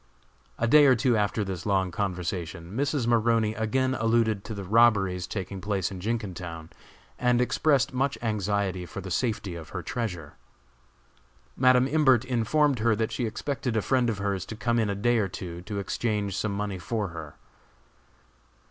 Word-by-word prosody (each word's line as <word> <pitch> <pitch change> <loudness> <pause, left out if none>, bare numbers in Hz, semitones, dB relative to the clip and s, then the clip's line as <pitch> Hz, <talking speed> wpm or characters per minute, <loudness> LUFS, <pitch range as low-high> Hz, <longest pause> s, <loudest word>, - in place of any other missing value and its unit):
A 115 - 0
day 145 +4 +7
or 130 - +6
two 120 +1 +2
after 105 0 0
this 95 -3 -5
long 95 -3 +1
conversation, 90 -2 -4
Mrs. 140 -1 0
Maroney 115 -2 +2
again 130 +4 0
alluded 115 -3 +1
to 110 - -5
the 100 - -5
robberies 95 -4 +3
taking 95 -1 -5
place 100 -2 -1
in 95 - -7
Jenkintown, 90 -6 -4 0.5
and 125 -1 +3
expressed 135 +2 +2
much 135 +2 0
anxiety 100 -4 -1
for - - -7
the 95 -1 -7
safety 105 -4 -1
of 85 -1 -8
her 90 -2 -5
treasure. 90 -7 -4 1.2
Madam 130 0 +4
Imbert 135 -5 +3
informed 130 +3 +1
her 110 0 +3
that 110 +1 -1
she 115 +1 -1
expected 125 0 -3
a - - +2
friend 125 +4 +2
of 110 - -2
hers 100 -2 -2
to 110 - -6
come 120 +1 0
in 110 -2 +1
a 100 - -1
day 120 +3 +2
or 100 - +1
two 90 -2 -7
to 100 +3 -6
exchange 100 -1 -2
some 105 +1 -1
money 100 -2 -3
for 105 +3 -2
her. 80 -3 -9
105 Hz, 170 wpm, -27 LUFS, 95-120 Hz, 1.2 s, day